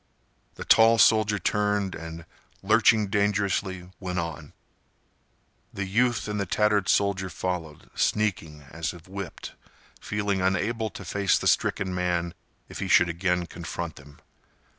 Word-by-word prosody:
The -, -, -8 dB
tall 115 Hz, +1 st, +6 dB
soldier 110 Hz, -2 st, +4 dB
turned 105 Hz, 0 st, 0 dB
and, 80 Hz, 0 st, -8 dB, 0.4 s
lurching 110 Hz, +1 st, +4 dB
dangerously, 100 Hz, -2 st, -1 dB
went 90 Hz, -2 st, -4 dB
on. 80 Hz, -3 st, -5 dB, 1.2 s
The 100 Hz, -, -4 dB
youth 115 Hz, +2 st, +1 dB
and 105 Hz, 0 st, -3 dB
the 100 Hz, -, -2 dB
tattered 105 Hz, -2 st, +1 dB
soldier 100 Hz, -2 st, +1 dB
followed, 85 Hz, -3 st, -5 dB
sneaking 85 Hz, -8 st, -1 dB
as 80 Hz, +3 st, -3 dB
if 85 Hz, 0 st, -15 dB
whipped, 95 Hz, -3 st, -7 dB, 0.5 s
feeling 100 Hz, -2 st, -2 dB
unable 105 Hz, +5 st, 0 dB
to 100 Hz, -, -10 dB
face 100 Hz, +2 st, +1 dB
the -, -, -5 dB
stricken 95 Hz, -1 st, +1 dB
man 90 Hz, -1 st, -1 dB, 0.3 s
if -, -, -9 dB
he -, -, -3 dB
should 90 Hz, -, +5 dB
again 90 Hz, +1 st, 0 dB
confront 85 Hz, -1 st, -6 dB
them. 75 Hz, 0 st, -15 dB
95 Hz, 135 wpm, -26 LUFS, 85-105 Hz, 1.2 s, tall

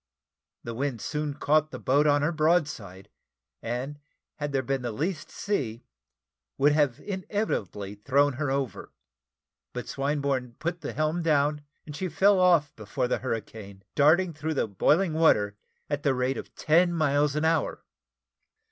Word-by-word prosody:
The 115 Hz, -, -5 dB
wind 130 Hz, 0 st, -2 dB
soon 150 Hz, +3 st, -3 dB
caught 155 Hz, +1 st, +2 dB
the -, -, -7 dB
boat 145 Hz, +3 st, +2 dB
on 145 Hz, 0 st, +3 dB
her 155 Hz, -, +2 dB
broadside, 150 Hz, -, 0 dB, 0.5 s
and 130 Hz, +5 st, -4 dB, 0.4 s
had 145 Hz, -1 st, -3 dB
there 135 Hz, -1 st, 0 dB
been 135 Hz, +1 st, -1 dB
the 120 Hz, -1 st, -3 dB
least 155 Hz, -, -3 dB
sea, 125 Hz, -, -3 dB, 0.7 s
would 145 Hz, +2 st, +4 dB
have 145 Hz, -5 st, +2 dB
inevitably 185 Hz, -, -3 dB
thrown 135 Hz, +7 st, +2 dB
her 145 Hz, -, 0 dB
over; 135 Hz, -6 st, -3 dB, 0.8 s
but 125 Hz, -, -5 dB
Swinburne 140 Hz, -3 st, -1 dB
put 170 Hz, +1 st, -3 dB
the -, -, -5 dB
helm 155 Hz, +3 st, 0 dB
down, 150 Hz, -2 st, +2 dB, 0.2 s
and 150 Hz, -, -8 dB
she 185 Hz, +4 st, -3 dB
fell 200 Hz, +2 st, +4 dB
off 170 Hz, -5 st, +4 dB
before 125 Hz, +4 st, -2 dB
the -, -, 0 dB
hurricane, 105 Hz, -5 st, -6 dB
darting 165 Hz, +5 st, +4 dB
through 155 Hz, +1 st, -3 dB
the 135 Hz, -, +1 dB
boiling 155 Hz, -, +2 dB
water 105 Hz, -11 st, +3 dB, 0.3 s
at 145 Hz, -1 st, -2 dB
the 140 Hz, -3 st, +1 dB
rate 125 Hz, +1 st, 0 dB
of -, -, -8 dB
ten 175 Hz, +3 st, +3 dB
miles 145 Hz, -2 st, +2 dB
an 150 Hz, +1 st, 0 dB
hour. 165 Hz, 0 st, 0 dB
145 Hz, 155 wpm, -27 LUFS, 125-155 Hz, 0.8 s, would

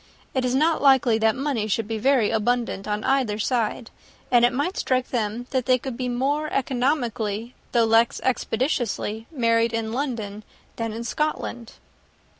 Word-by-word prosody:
It 260 Hz, -, 0 dB
is 250 Hz, 0 st, 0 dB
not 315 Hz, +4 st, +2 dB
likely 265 Hz, -5 st, +4 dB
that 220 Hz, -1 st, +3 dB
money 265 Hz, -6 st, -1 dB
should 220 Hz, +1 st, -1 dB
be 225 Hz, -1 st, -3 dB
very 255 Hz, -2 st, +3 dB
abundant 225 Hz, -2 st, 0 dB
on 210 Hz, 0 st, -2 dB
either 260 Hz, -6 st, +1 dB
side; 230 Hz, +1 st, -1 dB, 0.4 s
and 240 Hz, -1 st, +5 dB
it 240 Hz, -, +5 dB
might 285 Hz, +9 st, -1 dB
strike 255 Hz, -1 st, 0 dB
them 230 Hz, 0 st, -2 dB
that 260 Hz, -2 st, -1 dB
they 255 Hz, -1 st, +5 dB
could 255 Hz, 0 st, -6 dB
be 250 Hz, 0 st, -3 dB
more 285 Hz, +5 st, -1 dB
economically, 245 Hz, -4 st, -1 dB, 0.2 s
though 235 Hz, -2 st, +3 dB
less 225 Hz, +1 st, +3 dB
expeditiously, 235 Hz, -3 st, -1 dB
married 230 Hz, -5 st, +1 dB
in 225 Hz, -1 st, -2 dB
London, 225 Hz, -6 st, -3 dB, 0.3 s
than 230 Hz, -1 st, -2 dB
in 225 Hz, +2 st, -5 dB
Scotland." 245 Hz, -4 st, -3 dB
240 Hz, 160 wpm, -24 LUFS, 225-260 Hz, 0.4 s, and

